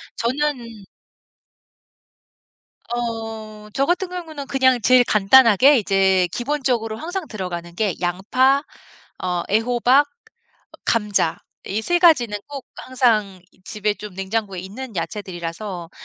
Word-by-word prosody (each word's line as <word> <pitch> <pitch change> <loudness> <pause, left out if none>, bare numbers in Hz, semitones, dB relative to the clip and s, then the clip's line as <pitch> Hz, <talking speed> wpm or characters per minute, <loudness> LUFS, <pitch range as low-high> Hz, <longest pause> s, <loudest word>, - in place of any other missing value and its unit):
저는 235 -4 -2 2.1
어 225 -2 -5
저 275 - +1
같은 360 +2 0
경우는 320 -6 -7
그냥 260 -3 +2
제일 255 +1 +5
간단하게 240 +5 +5
이제 190 -3 +2
기본적으로 245 -4 -1
항상 355 - -5
들어가는 175 -4 -6
게 205 -4 0
양파 255 - +2 0.6
어 180 -1 -1
애호박 245 +6 +3
어 450 +7 -32 0.5
감자 210 -7 +1 0.3
이 215 +3 -2
3 350 +5 +1
가지는 245 - +4
꼭 280 -2 -8
항상 220 -7 0
이 - - -29
집에 210 -1 -2
좀 210 -3 -10
냉장고에 195 -1 -3
있는 220 +5 -8
야채들이라서 175 -1 -5
225 Hz, 235 characters per minute, -21 LUFS, 195-265 Hz, 2.1 s, 제일